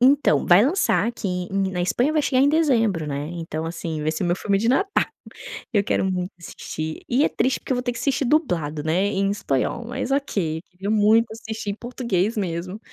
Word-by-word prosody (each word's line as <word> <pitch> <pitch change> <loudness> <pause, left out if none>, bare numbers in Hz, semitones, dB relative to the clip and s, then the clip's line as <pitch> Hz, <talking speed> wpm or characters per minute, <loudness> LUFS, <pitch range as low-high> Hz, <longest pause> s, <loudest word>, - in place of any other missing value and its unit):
Então, 260 - +4
vai 180 +6 +7
lançar 305 - +2
aqui 235 -3 -3 0.2
em 195 0 0
na 180 - -3
Espanha 245 +11 +1
vai 305 -1 +2
chegar 260 -1 +2
em 285 - +5
dezembro, 230 - +2
né, 145 0 -3
então, 165 -2 -4
assim, 165 -2 -4
esse 155 +3 -1
é - - +1
meu 175 - +1
filme 200 +1 0
de 225 +3 0
Natal, 390 +11 +2 0.7
eu 205 - +3
quero - - 0
muito 185 -1 -2
assistir 155 -1 -6
e 260 +5 +2
é - - +3
triste 260 - 0
porque - - -7
eu - - +3
vou 245 - -2
ter 245 - -1
que - - -6
assistir 275 -1 0
dublado, 170 - 0
né, 165 +5 +1
em 195 -1 0
espanhol, 200 - -1
mas 245 +2 -4
ok, 195 - -1
queria 190 +2 -6
muito 220 +2 +4
assistir 220 -2 -6
em 200 - -2
português 230 -4 -1
mesmo, 185 +1 -3
205 Hz, 210 wpm, -23 LUFS, 175-250 Hz, 0.7 s, vai